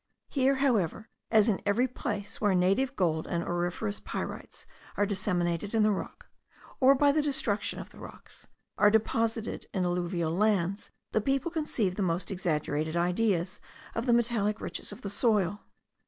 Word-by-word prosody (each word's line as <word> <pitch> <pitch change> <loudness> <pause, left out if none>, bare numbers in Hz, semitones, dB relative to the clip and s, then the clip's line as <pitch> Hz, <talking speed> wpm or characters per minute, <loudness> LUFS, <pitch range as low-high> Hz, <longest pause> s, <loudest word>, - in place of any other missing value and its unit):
Here, 270 -1 +2
however, 220 - 0 0.2
as 220 -1 +5
in 210 -4 +1
every 225 +6 +2
place 205 -5 -5
where 205 -3 +3
native 195 +10 +2
gold 160 -6 0
and 170 -2 -1
auriferous 175 +4 -2
pyrites - - -6 0.3
are 205 - +3
disseminated 190 -1 -1
in 220 - +4
the 215 - +4
rock, 200 - -5 0.5
or 270 +1 +6
by 285 +1 +4
the 305 +2 +2
destruction 265 -8 -1
of - - -8
the - - -15
rocks, - - -11 0.3
are 210 - +7
deposited 225 +1 0
in 185 -1 +1
alluvial 175 -2 -1
lands, 195 -1 +1 0.2
the 220 - +2
people 275 +7 0
conceive 240 - -1
the - - -1
most 175 0 -1
exaggerated 155 -3 -1
ideas 180 +1 0 0.3
of 230 +3 -3
the 240 - +5
metallic 225 -3 +1
riches - - -5
of - - -10
the 200 - -4
soil. 205 -3 +1
205 Hz, 160 wpm, -29 LUFS, 180-230 Hz, 0.5 s, are